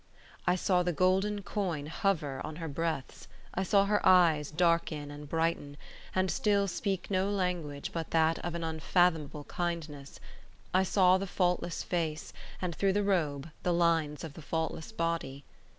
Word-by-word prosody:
I - - +4
saw 185 0 +2
the 175 0 0
golden 190 +4 +1
coin 180 -8 -2
hover 160 -5 -1
on 155 0 -6
her 165 0 -5
breaths; 160 -2 -3 0.3
I 190 - -1
saw 195 +1 +3
her 205 +1 +1
eyes 165 -6 +5
darken 160 -3 +1
and 145 0 -9
brighter, 165 -3 -1 0.4
and 185 -1 +2
still 200 +3 +2
speak 195 0 -3
no 190 +1 +1
language 180 -7 -2
but 165 -1 -3
that 160 0 +2
of 175 -1 -4
an 170 - -3
unfathomable 160 -2 +1
kindness; 160 -5 -4 0.5
I 185 - +5
saw 185 -1 +4
the 195 - -3
faultless 180 -2 0
face, 160 -3 -2 0.3
and, 180 -2 -2
through 195 -1 +2
the 205 +1 +1
robe, 160 -6 0
the 180 - +1
lines 165 -4 +1
of 160 -3 -6
the 165 - -10
faultless 160 +4 -3
body. 165 -8 -2
170 Hz, 160 wpm, -31 LUFS, 155-185 Hz, 0.5 s, eyes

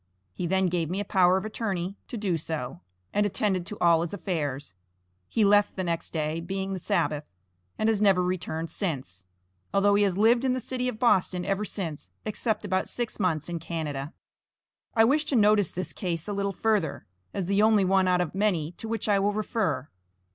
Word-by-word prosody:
He 175 - -3
then 190 +2 +2
gave 170 -3 0
me 185 +3 -2
a 205 - -2
power 185 -2 +4
of 190 - -3
attorney 195 -4 -3
to 240 - -5
do 200 -5 0
so, 150 - -4 0.3
and 205 - +3
attended 195 -3 0
to 210 - -6
all 170 -1 +4
his 170 +3 -3
affairs. 145 - -3 0.5
He 220 - +2
left 205 0 +4
the 185 - -2
next 170 -1 -2
day, 155 0 -1
being 190 +3 -3
the 190 - -3
Sabbath, 150 -3 -1 0.5
and 215 - +1
has 220 -2 +2
never 195 -3 +4
returned 175 -3 -2
since, 130 - -4 0.4
although 200 +1 +4
he 205 - +4
has 195 -3 +2
lived 235 +4 +4
in 260 -1 +2
the 255 - -1
City 250 +1 -2
of 250 -3 -3
Boston 185 -6 +2
ever 195 +1 0
since, 165 -8 -5 0.2
except 215 0 -1
about 190 -1 0
six 240 -2 -3
months 165 -6 0
in 170 -1 -3
Canada. 150 -3 -4 0.8
I 225 - +6
wish 295 +6 +3
to 290 - 0
notice 210 -4 +4
this 170 -4 -5
case 170 -3 -3
a 205 - -2
little 200 0 -1
further, 210 -2 0 0.3
as 190 - -3
the 200 +3 +2
only 215 -2 +5
one 190 0 +3
out 180 -1 +3
of 175 - -2
many 185 -6 +1
to 225 - -7
which 225 0 -2
I 205 -2 +4
will 205 +1 +1
refer. 200 - -1
190 Hz, 200 wpm, -27 LUFS, 170-210 Hz, 0.8 s, I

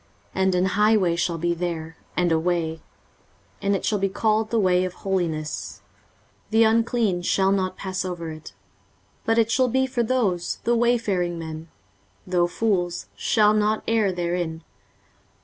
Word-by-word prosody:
23:035:008 190 - 0
And 190 -1 +2
an 180 +1 +2
highway 205 -2 +3
shall 170 0 -1
be 170 +1 0
there, 165 -2 -4 0.2
and 175 -1 +2
a 160 - +3
way, 165 -2 -1 0.8
and 200 0 +1
it - - -3
shall 210 - +1
be 195 0 +1
called 215 +2 +1
The 230 - 0
way 185 -2 +3
of 185 -1 -3
holiness; 165 -6 -3 0.7
the 225 +1 +4
unclean 225 -4 +2
shall 190 +2 +2
not 185 -1 0
pass 190 -1 -3
over 175 -3 -5
it; 155 0 -10 0.7
but 225 0 +2
it 230 0 +3
shall 255 0 +3
be 260 +2 +2
for 255 -2 -1
those: 220 -8 0
the 235 - +2
wayfaring 215 -8 +1
men, 160 0 -7 0.6
though 180 -1 +2
fools, 175 -3 -1
shall 210 -1 +3
not 215 0 +1
err 220 -4 +2
therein. 175 -2 -3
185 Hz, 160 wpm, -24 LUFS, 175-220 Hz, 0.8 s, the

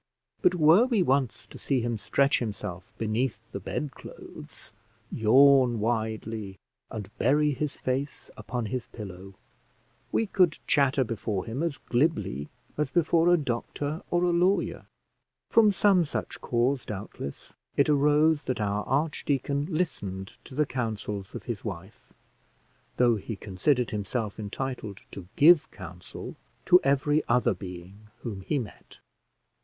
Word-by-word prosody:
But 180 - +4
were 170 +7 +6
we 230 -7 +2
once 130 -7 0
to - - -13
see 135 -3 0
him 120 0 -1
stretch 140 +6 +2
himself 95 -5 -5
beneath 110 +2 -1
the 100 - -4
bed 140 +9 -4
clothes, - - -11 0.4
yawn 130 +1 +5
widely, 110 -2 -2 0.3
and 105 0 -7
bury 150 +4 +3
his 145 +1 -3
face 135 +2 -3
upon 120 -2 -4
his 125 +2 -4
pillow, 95 -3 -9 0.8
we 225 - +2
could 185 -5 +2
chatter 140 -2 +3
before 105 -4 -3
him 120 +6 -4
as 165 -4 -1
glibly 120 - 0 0.3
as 150 -2 +1
before 170 +1 +3
a 175 - +6
doctor 145 +3 -3
or 175 0 +1
a 175 - +3
lawyer. 180 +3 +1 0.6
From 220 -2 +6
some 195 -1 +4
such 150 - -5
cause, 125 +3 +1
doubtless, 95 -8 -7 0.2
it 140 - +4
arose 150 +1 +3
that 130 - -2
our 105 0 0
archdeacon 140 -1 0
listened 100 - -3
to 130 - -11
the 150 +2 +2
counsels 105 -6 -4
of - - -6
his 115 -5 -5
wife, 95 0 -8 0.9
though 120 -2 +4
he 110 +2 -5
considered 115 +7 0
himself 105 +1 -3
entitled 110 -1 -5
to 95 -3 -9
give 155 +1 +6
counsel 90 -2 -9 0.3
to 180 - +7
every 140 +2 +2
other 120 -1 +3
being 95 +3 -10 0.2
whom 105 -5 -5
he 145 +10 -1
met. 115 -6 -8
125 Hz, 140 wpm, -27 LUFS, 105-150 Hz, 0.9 s, to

